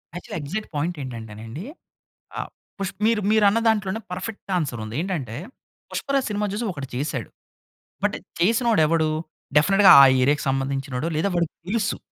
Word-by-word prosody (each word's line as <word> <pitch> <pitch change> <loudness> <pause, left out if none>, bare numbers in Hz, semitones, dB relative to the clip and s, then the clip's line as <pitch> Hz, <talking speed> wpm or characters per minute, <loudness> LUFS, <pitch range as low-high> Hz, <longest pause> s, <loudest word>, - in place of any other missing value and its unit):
Actually 175 - -6
exact 195 +10 -4
point 165 +5 -1
ఏంటంటేనండి, 115 - -7 0.7
ఆహ్, - - -4 0.3
push 195 -1 -3
మీరు 225 -1 +3
మీరు 220 -1 +4
అన్న 210 - +3
దాంట్లోనే 210 -1 0
పర్ఫెక్ట్ 195 +3 -6
ఆన్సర్ 135 -9 -3
ఉంది. 110 +1 -7
ఏంటంటే, 160 - -3 0.6
పుష్ప‌రాజ్ 275 -2 0
సినిమా 210 0 0
చూసి 225 +3 -2
ఒకడు 140 -5 -7
చేసాడు. 130 -3 -3 0.8
బట్ - - +1 0.2
చేసినోడు 225 +2 +3
ఎవడు 160 0 +2 0.5
డెఫినిట్‌గా 195 +6 +6
ఆ - - +10 0.2
ఏరియాకి 145 +2 +2
సంబంధించినోడు 135 +2 -2
లేదా, 195 +5 +1
వాడికి 170 -2 -1
తెలుసు. 220 +1 0
170 Hz, 145 wpm, -23 LUFS, 135-210 Hz, 0.8 s, ఆ